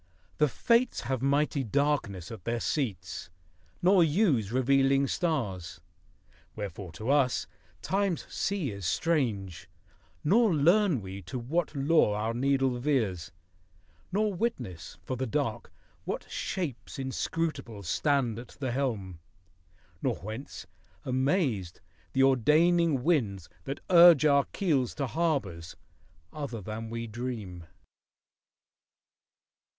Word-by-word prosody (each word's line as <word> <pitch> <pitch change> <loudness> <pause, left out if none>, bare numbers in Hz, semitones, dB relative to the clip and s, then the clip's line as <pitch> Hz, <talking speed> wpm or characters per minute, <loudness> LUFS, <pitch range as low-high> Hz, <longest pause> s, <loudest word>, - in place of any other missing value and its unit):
The 150 - +5
Fates 235 - +2
have 130 -2 -2
mighty 140 +1 +1
darkness 120 - -1
at 110 -6 -9
their 120 +3 -1
seats, 95 - -3 0.5
Nor 185 0 +6
use 150 - +2
revealing 135 +2 +3
stars. 120 - -2 0.8
Wherefore 100 -3 -6
to 110 - -2
us 140 -3 +2 0.4
Time's 195 -3 0
sea 190 - -2
is 100 -1 -8
strange, 100 - -1 0.5
nor 205 +3 +4
learn 170 - +3
we 95 +1 -7
to 110 +9 -6
what 150 +7 -2
Law 140 -6 +3
Our 110 +2 -1
needle 135 0 +1
veers, 110 - 0 0.8
nor 210 +2 +1
witness, 170 - -4
for 130 - -3
the 130 +1 -2
Dark, 120 -3 -2 0.3
What - - -3
Shapes 140 - -4
inscrutable 135 -4 -3
stand 125 - +1
at 120 - -12
the 130 -3 -2
helm, 110 -10 -2 0.8
Nor - - 0
whence 110 +8 -8 0.4
(amazed) 130 - 0 0.3
the 135 - +3
ordaining 150 +3 +3
winds 110 - 0 0.2
that 135 +1 -5
urge 170 -4 +8
Our 140 -2 +4
keels 145 - 0
to 140 - -1
harbors 125 - -2 0.6
other 140 -6 -5
than 110 +3 -6
we 115 0 -4
dream. 110 -7 -6
130 Hz, 115 wpm, -29 LUFS, 110-155 Hz, 0.8 s, urge